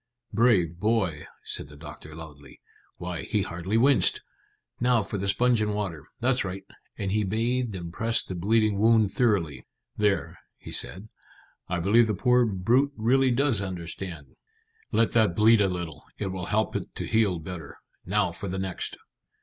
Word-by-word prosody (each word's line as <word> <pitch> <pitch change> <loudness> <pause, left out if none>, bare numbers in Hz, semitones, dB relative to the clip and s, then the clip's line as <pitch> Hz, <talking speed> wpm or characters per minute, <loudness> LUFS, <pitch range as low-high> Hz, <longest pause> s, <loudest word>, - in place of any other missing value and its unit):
"Brave 100 -7 +3
boy!" 100 -8 0 0.2
said - - -4
the 75 - -14
doctor 75 +1 -10
loudly. 75 -3 -11 0.4
"Why, 90 -1 -4
he 105 -4 -1
hardly 90 +6 -2
winced. 135 +3 +4 0.6
Now 120 -2 +3
for 100 0 -4
the 100 - -2
sponge 120 +3 +3
and 105 -1 0
water. 85 -8 -4
That's 125 +2 +2
right," 95 0 -5 0.3
and 95 -1 -2
he 105 +1 +1
bathed 115 +3 -1
and 85 -2 -6
pressed 115 +3 +1
the - - -4
bleeding 105 +3 +2
wound 110 -2 +4
thoroughly. 100 - +1 0.3
"There," 105 -2 0 0.2
he - - -10
said; 100 +5 -2 0.6
"I 85 -1 -1
believe 110 +7 +4
the 105 - 0
poor 125 +2 +3
brute 120 +9 +2
really 130 +4 +3
does 125 -3 +2
understand. 85 -5 -6 0.6
Let 115 - +2
that 110 -7 +3
bleed 110 +1 +5
a 100 - +4
little; 85 -5 -5
it 100 -3 -3
will 90 -1 -4
help 110 +1 0
it - - -5
to - - -3
heal 110 -5 +2
better. 80 -3 -8 0.3
Now 100 -1 +1
for 100 - -7
the 95 - -3
next." 95 -1 -3
100 Hz, 165 wpm, -27 LUFS, 90-115 Hz, 0.6 s, bleed